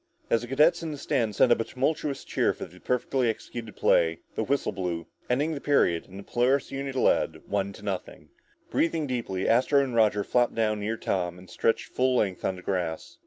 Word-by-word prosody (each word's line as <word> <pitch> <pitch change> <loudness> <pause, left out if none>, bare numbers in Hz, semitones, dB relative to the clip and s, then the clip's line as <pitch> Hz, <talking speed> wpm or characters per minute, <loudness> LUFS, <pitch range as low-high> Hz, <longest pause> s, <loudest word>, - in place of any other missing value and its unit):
As 115 - +3
the 120 - -7
cadets 155 +7 +4
in 165 - -4
the 150 - -5
stands 120 -7 -1
sent 120 - +5
up 120 - +5
a - - +1
tumultuous 140 +3 -2
cheer - - +1
for - - -7
the 90 - -16
perfectly 125 +1 0
executed 110 0 -6
play, 80 0 +2
the - - -1
whistle 140 +5 0
blew, 85 -3 -3 0.2
ending 145 +6 +1
the 140 - -5
period 90 - +2
and 95 - -11
the 100 - -8
Polaris 125 +5 +1
unit 135 0 -4
led, 130 - +1
one 100 -1 -1
to 100 - -13
nothing. 100 -3 -5 0.4
Breathing 165 -2 +1
deeply, 115 -8 -2
Astro 135 +4 +4
and 130 -3 -4
Roger 105 -3 +3
flopped 120 +2 +1
down 110 -2 +1
near 110 +2 -2
Tom 90 -4 -2
and 90 +1 -14
stretched 115 - 0
full 130 0 +2
length 95 -6 0
on 95 - 0
the 90 - -11
grass. 90 -4 -3
115 Hz, 210 wpm, -27 LUFS, 95-135 Hz, 0.4 s, sent